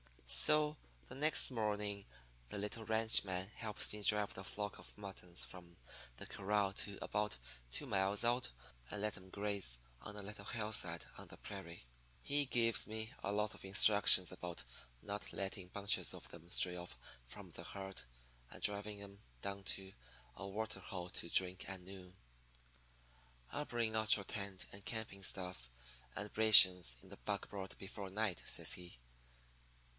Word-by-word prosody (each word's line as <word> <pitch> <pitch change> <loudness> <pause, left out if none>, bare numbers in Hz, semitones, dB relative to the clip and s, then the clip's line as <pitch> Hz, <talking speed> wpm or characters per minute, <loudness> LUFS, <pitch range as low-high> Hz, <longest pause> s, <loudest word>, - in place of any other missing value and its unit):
"So 150 - +6 0.3
the - - -7
next 150 0 +4
morning 105 -3 -2 0.4
the - - -5
little 105 +2 -4
ranchman 105 -4 +3
helps 110 -2 -2
me 105 - -6
drive 105 0 +3
the 95 - -7
flock 105 +1 -5
of - - -10
muttons 95 -3 -4
from 85 -2 -12 0.4
the - - -7
corral 100 0 0
to 100 0 -1
about 105 -6 -1 0.3
two - - -1
miles 100 +2 +1
out 120 +1 +2 0.4
and 105 - -3
let 105 0 -1
'em 95 - -12
graze 100 -11 -1 0.2
on 105 - -8
a 105 - -4
little 100 0 -7
hillside 105 -7 +2
on - - -10
the - - -11
prairie. 95 -6 -8 0.4
He 145 0 +2
gives 115 -4 +4
me 110 +2 -4
a 100 - -2
lot 105 +1 0
of - - -11
instructions 100 -1 +7
about 90 -1 -6 0.4
not 100 -1 -4
letting 95 -1 -4
bunches 100 +2 -1
of - - -9
them 85 0 -12
stray 90 0 +3
off 90 0 -8 0.3
from - - -11
the - - -8
herd, 95 -5 -6 0.5
and - - -10
driving 105 0 0
'em 100 0 -12 0.2
down 100 0 -5
to 95 0 -1 0.4
a 100 - -6
water 110 +3 -4
hole 90 -3 -6
to 85 - -2
drink 90 +1 +2
at 95 -1 -6
noon. 90 0 -10 1.4
"'I'll 150 - -3
bring 115 -3 0
out 110 0 +5
your 100 - -5
tent 100 -2 -4
and 100 0 -9
camping 110 -4 -4
outfit 90 -10 -6 0.5
and 105 0 -5
rations 95 - +7
in - - -16
the - - -10
buckboard 95 -2 -4
before 95 0 -6
night,' 100 -2 -1
says - - +1
he. 90 -6 -7
100 Hz, 160 wpm, -38 LUFS, 95-105 Hz, 1.4 s, instructions